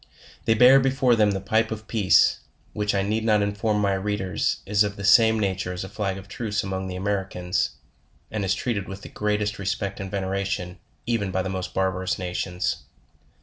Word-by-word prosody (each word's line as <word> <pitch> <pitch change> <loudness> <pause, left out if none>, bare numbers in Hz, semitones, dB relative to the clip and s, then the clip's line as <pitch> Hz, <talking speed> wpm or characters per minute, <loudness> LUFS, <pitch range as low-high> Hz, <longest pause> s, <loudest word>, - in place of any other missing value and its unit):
They 115 - +3
bear 125 +4 +7
before 130 -2 +3
them 105 -2 +4
the 100 -1 -1
Pipe 110 +4 +1
of 110 0 -6
peace, 105 -5 +4 0.3
which 105 -1 -1
I 100 - +1
need 110 +3 -1
not 105 -2 +3
inform 105 +1 0
my 100 -1 +2
readers 95 -1 -1
is 105 +1 +3
of 100 0 -3
the 100 - -7
same 110 +2 +6
nature 95 -3 -1
as 90 - -5
a - - -6
flag 100 -3 -3
of 95 0 -10
truce 105 -1 -3
among 95 -1 -3
the 90 - -5
Americans,, 95 -1 -1 0.6
and 110 -2 -2
is 95 0 +1
treated 100 -3 -2
with 95 +1 -8
the - - -8
greatest 105 -1 -1
res 100 0 -1
pect 100 -1 -5
and 95 -1 -5
veneration, 95 -2 -3 0.3
even 115 -4 0
by 95 0 -1
the 95 - -3
most 95 -1 -5
barbarous 95 -1 0
nations. 90 0 -2
100 Hz, 195 wpm, -24 LUFS, 95-105 Hz, 0.6 s, bear